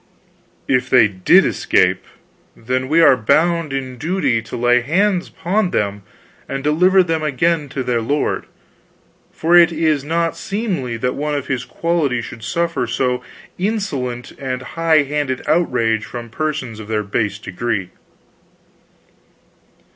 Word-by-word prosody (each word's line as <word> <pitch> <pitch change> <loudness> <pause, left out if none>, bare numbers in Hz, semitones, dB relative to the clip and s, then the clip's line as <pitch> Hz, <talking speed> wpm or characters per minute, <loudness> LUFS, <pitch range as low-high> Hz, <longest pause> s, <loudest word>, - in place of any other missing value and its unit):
"If 125 -1 +1
they 125 -4 +6
did 95 -3 +4
escape, - - +1 0.5
then 130 +3 -2
are - - -8 0.3
we - - -13
bound 165 +6 +2
in 130 -2 -4
duty 150 -8 0
to 110 - -7
lay 120 +1 +3
hands 185 - +1
upon 190 +2 -1
them 100 - -1 0.5
and 135 0 -4
deliver 180 +6 +4
them 165 -2 -1
again 155 +1 0
to 130 - -3
their 120 -2 0
lord; 145 +6 -1 0.9
for 170 +2 +1
it 170 -1 +7
is 155 -3 +1
not 165 +2 -1
seemly 185 - -3
that 125 +2 -1
one 150 +1 -2
of 140 - -3
his 125 -2 -3
quality 165 -7 -1
should 115 -1 -8
suffer 170 -1 -1
a - - -10
so 125 +1 -1 0.4
insolent 150 - -2
and 130 -1 -4
high 165 -2 +3
handed 140 -2 -2
outrage 125 -9 +1
from 120 0 -7
persons 140 -5 -3
of 105 - -9
their 105 -1 -1
base 100 0 -1
degree." 100 -1 -3
135 Hz, 140 wpm, -19 LUFS, 120-165 Hz, 0.9 s, it